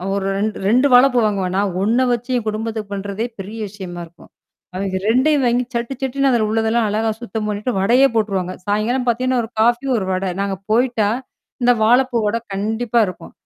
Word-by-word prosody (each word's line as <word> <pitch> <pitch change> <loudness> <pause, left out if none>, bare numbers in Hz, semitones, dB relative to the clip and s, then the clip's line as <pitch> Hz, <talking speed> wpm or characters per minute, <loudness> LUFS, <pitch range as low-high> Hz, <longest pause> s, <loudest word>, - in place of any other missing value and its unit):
ஒரு 200 -1 -2
இரண் 205 +3 0
இரண்டு 245 +8 +4
வாழைப்பூ 250 0 +6
வாங்குவன்னா. 195 -3 -1
நான் 185 -2 -3
ஒண்ண 230 +5 +2
வைச்சு 240 +1 -2
என் 230 - -4
குடும்பத்திற்குப் 215 -1 -3
பண்றதே 200 +2 -3
பெரிய 205 +4 -7
விஷயமா 185 -3 -8
இருக்கும். 170 +1 -19 0.5
அவிவ்க 190 0 -2
இரண்டையும் 260 +6 +3
வாங்கிச் 245 +1 0
சட்டுச் 235 +3 -3
சட்டென்று 270 +1 +1
அதிலுள்ளதெல்லாம் 225 0 +1
அழகாகச் 220 +1 -1
சுத்தம் 220 -2 -4
பண்ணிவிட்டு 210 +4 -2
வடையே 245 +8 +4
போட்றுவாங்க. 195 -5 0
சாயங்காலம் 220 +5 0
பார்த்தீங்கனா 250 +2 +1
ஒரு 225 - -7
காபி 240 +4 +2
ஒரு 190 - -2
வடை 185 +1 -1
நாங்க 200 -1 -1 0.2
போயிட்டா 235 -2 +2 0.5
இந்த 245 - +5
வாழைப்பூ 245 +2 +3
வடை 220 +3 0
கண்டிப்பா 220 +4 0
இருக்கும். 185 - -9
220 Hz, 170 wpm, -19 LUFS, 200-245 Hz, 0.5 s, வாழைப்பூ